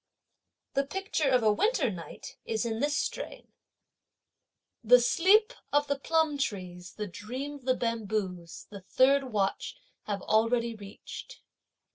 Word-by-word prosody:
The 275 - +2
picture 320 -1 -1
of 250 -3 +3
a 215 -1 +4
winter 420 - +1
night 170 -3 -9
is 220 0 -2
in 225 -1 -2
this 290 +2 +1
strain: - - -4 1.3
The 250 +2 +7
sleep 385 - +4 0.2
of 290 0 +3
the 285 -1 -2
plum 320 -1 +1
trees, 185 -7 -4
the 210 - -3
dream 250 +10 -6
of 280 -4 -12
the 255 -1 +3
bamboos 210 -7 -3
the 200 -2 -9
third 270 +8 +3
watch 205 -6 -2 0.3
have 200 -2 -3
already 230 +2 +2
reached. 210 - -10
240 Hz, 135 wpm, -29 LUFS, 210-285 Hz, 1.3 s, The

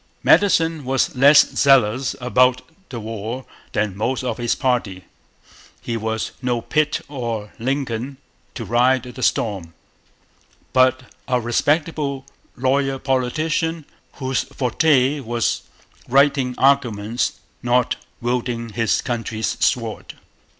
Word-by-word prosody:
Madison 165 -6 +3
was 130 +1 0
less 140 +3 +7
zealous 130 -2 +3
about 125 0 +2 0.3
the 120 - -6
war 115 +3 -5 0.3
than 105 -3 -1
most 120 +5 -2
of 125 - -3
his 120 -1 0
party. 115 -8 -1 0.8
He 115 - -4
was 110 0 -2
no 125 -2 0
Pitt 155 +5 0
or 115 -7 -5
Lincoln 130 0 -3 0.4
to - - -5
ride 125 +2 +2
the 125 0 -9
storm, 95 -8 -1 1.0
but 130 0 +3 0.2
a 125 -2 +1
respectable 140 +3 0 0.3
lawyer 135 +1 +1
politician, 155 +5 -1 0.3
whose 130 -1 -2
forte 135 +2 +2
was 120 -3 -1 0.5
writing 135 -1 +3
arguments, 120 -5 +1 0.3
not 120 0 +2 0.3
wielding 120 -1 -2
his 115 +1 0
country's 115 -2 -2
sword. 115 -3 -1
125 Hz, 110 wpm, -21 LUFS, 115-135 Hz, 1.0 s, less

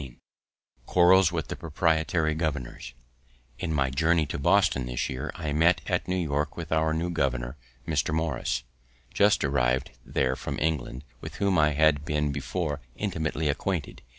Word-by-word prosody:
XV 65 -3 -10 0.7
QUARRELS 90 0 +5
WITH 80 -4 -3
THE - - -3
PROPRIETARY 80 0 +1
GOVERNORS 75 -8 -4 0.6
In 85 - -2
my 70 -4 +1
journey 80 +3 +2
to 70 - -5
Boston 85 -5 +3
this 60 0 -2
year, 65 +4 -4
I 75 -4 -3
met 80 +3 +3
at - - -1
New 90 - 0
York 75 -4 -1
with 85 -2 -6
our 80 0 +2
new 85 +3 -1
governor, 65 -5 -1 0.3
Mr. - - 0
Morris, 80 -5 -1 0.5
just 105 0 +4
arriv'd 65 -2 +1
there 65 +1 0
from - - -5
England, 75 -4 -2 0.2
with - - -8
whom 100 -4 +2
I 75 0 +4
had 75 -1 +3
been 75 -1 0
before 75 +1 -3
intimately 80 -6 -2
acquainted. 75 +2 -2
80 Hz, 155 wpm, -27 LUFS, 70-85 Hz, 0.7 s, QUARRELS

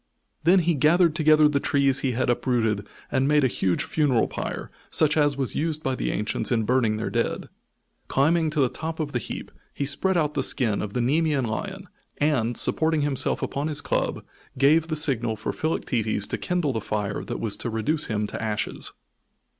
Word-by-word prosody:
Then 180 +2 +6
he 170 +1 +2
gathered 160 +3 +3
together 155 -2 +5
the 145 -1 +1
trees 140 -1 +2
he 135 -2 -1
had 130 +2 0
uprooted 115 -4 0 0.2
and 135 0 +2
made 150 0 +3
a - - +5
huge 95 -6 0
funeral 140 -7 +1
pyre, - - -5 0.2
such 150 -1 +2
as 145 -2 +2
was 135 -3 -1
used 155 0 -1
by 135 - 0
the - - -2
ancients 105 +1 -1
in 115 -2 +2
burning 115 -2 +1
their 110 - -3
dead. - - -2 0.6
Climbing 160 +4 +2
to 150 -1 0
the 130 - +4
top 160 +6 -6
of 150 -2 -2
the 120 - -1
heap, - - -7 0.2
he 140 - -2
spread 180 +6 0
out 150 -2 +1
the 145 - 0
skin 115 -5 +1
of 105 -1 -5
the 125 - 0
Nemean 145 +1 +1
lion, 190 - -5 0.3
and, 125 -6 +1
supporting 160 -1 +3
himself 145 -2 0
upon 140 +2 -2
his 150 -2 -1
club, - - -1 0.3
gave 155 +5 +4
the 160 - -2
signal 125 -7 0
for 105 - -4
Philoctetes 115 -9 -1
to - - -3
kindle 175 -6 -1
the 110 - -2
fire 105 -1 -3
that 120 - -5
was 110 -3 -2
to 120 - -4
reduce 130 +8 -1
him 105 -1 -1
to - - -6
ashes. 110 -1 -3
140 Hz, 195 wpm, -25 LUFS, 115-155 Hz, 0.6 s, Then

